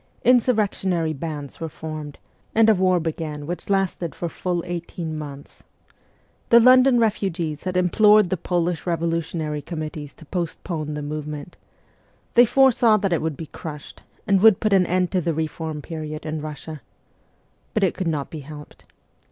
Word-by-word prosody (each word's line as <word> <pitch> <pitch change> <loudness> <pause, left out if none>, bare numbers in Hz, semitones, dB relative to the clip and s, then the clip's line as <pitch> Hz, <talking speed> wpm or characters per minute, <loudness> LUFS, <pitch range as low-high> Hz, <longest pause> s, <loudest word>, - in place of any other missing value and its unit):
Insurrectionary 205 -9 +2
bands 145 -1 -6
were 165 -1 -4
formed, 155 -2 -7 0.4
and 225 0 +6
a - - +6
war 185 -2 +2
began 155 -2 -4
which 175 +5 -5
lasted 190 -4 0
for 170 - -3
full 175 0 -3
eighteen 170 -2 -5
months. 145 -2 -9 0.9
The 235 - +8
London 255 +2 +6
SIBERIA 225 -2 +4
203 200 -1 -3
refugees 155 -3 -3
had 185 -1 -1
implored 210 +2 +5
the - - +2
Polish 175 0 -1
revolutionary 165 -2 -2
com 160 +1 -6
mittees 150 -2 -7
to 160 - -15
postpone 165 -2 -4
the 150 - -4
movement. 150 +1 -6 0.8
They 240 +1 +7
foresaw 240 -3 +4
that 195 -3 0
it 165 - +1
would 155 -3 -2
be 165 - -6
crushed, 150 -1 -9 0.2
and 195 -2 +3
would 220 -2 +7
put 215 -2 +1
an 185 -2 +4
end 180 0 +1
to 185 - +1
the 165 -1 -1
reform 160 -1 -4
period 155 -1 -6
in 155 -1 -3
Kussia. 155 0 -7 1.0
But 215 - +2
it 185 - +2
could 185 - -3
not 150 -4 -2
be 160 - -6
helped. 150 +1 -12
165 Hz, 170 wpm, -23 LUFS, 155-190 Hz, 1.0 s, The